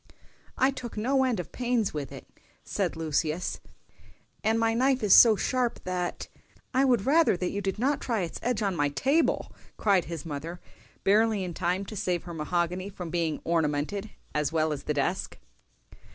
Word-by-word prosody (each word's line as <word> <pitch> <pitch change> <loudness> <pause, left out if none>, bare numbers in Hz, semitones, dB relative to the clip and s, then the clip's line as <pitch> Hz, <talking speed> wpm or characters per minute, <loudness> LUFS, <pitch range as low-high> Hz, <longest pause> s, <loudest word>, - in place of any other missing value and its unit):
"I 265 +1 +4
took 250 -4 -7
no 265 +5 +2
end 250 -6 0
of 175 - -6
pains 240 -4 0
with 145 -3 -4
it," - - -9 0.4
said - - -2
Lucius, 160 +1 -1 0.8
"and 225 +1 +2
my 225 0 +2
knife 260 +1 +2
is 205 - +5
so 225 -3 +9
sharp 250 +3 -1
that"— 180 -1 -3 0.5
"I 260 +1 +4
would 245 -6 +2
rather 310 - +4
that 180 0 -2
you 200 - -3
did 195 0 -2
not 270 +5 +1
try 230 -5 -1
its 170 - -4
edge 235 -3 0
on 195 -2 0
my 145 -3 +1
table," 280 - +1 0.2
cried 195 -5 +3
his 165 -3 -6
mother, 165 +3 -5 0.4
barely 215 0 +3
in 180 -2 -4
time 180 +3 -1
to 215 - -8
save 180 -4 -1
her 175 - -8
mahogany 175 +4 -1
from 180 -4 -7
being 165 -3 -1
"ornamented" 165 +5 -1 0.2
as 150 -1 0
well 155 -1 +1
as 140 -1 -7
the 150 - -1
desk. 160 +7 -1
190 Hz, 180 wpm, -28 LUFS, 165-230 Hz, 0.8 s, so